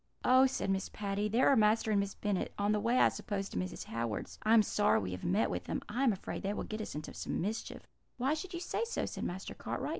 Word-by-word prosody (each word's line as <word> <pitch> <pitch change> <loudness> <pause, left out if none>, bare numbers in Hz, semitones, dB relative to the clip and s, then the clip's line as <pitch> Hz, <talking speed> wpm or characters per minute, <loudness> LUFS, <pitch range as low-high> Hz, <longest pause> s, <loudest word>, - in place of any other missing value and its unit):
"'Oh!' 260 +1 +7
said 225 -6 -1
Miss 190 0 -1
Patty, 205 0 -2
'there 235 +5 +3
are 275 - +6
Master 220 0 +3
and 205 - +3
Miss 200 0 -2
Bennet 205 -3 -1
on 205 +1 +1
the 210 - +2
way, 235 +4 +2
I - - +6
suppose, 195 -2 -4
to - - -6
Mrs. 90 0 -3
Howard's. 115 -2 -4
I 220 +1 +4
am 220 - +7
sorry 205 0 +3
we 95 -2 -3
have 90 0 -6
met 200 +5 +2
with - - -3
them; - - -3
I 240 +6 -1
am 260 - +5
afraid 195 - -5
they 200 +1 -2
will - - -3
get 215 0 -5
us 215 - -6
into 150 - -6
some - - -3
mischief.' 210 +5 -4 0.3
"'Why 260 +4 +1
should 355 +3 -5
you - - -3
say 360 - -1
so?' 465 - -2
said - - -5
Master 185 +2 -4
Cartwright. - - -4
210 Hz, 265 wpm, -33 LUFS, 195-235 Hz, 0.3 s, Oh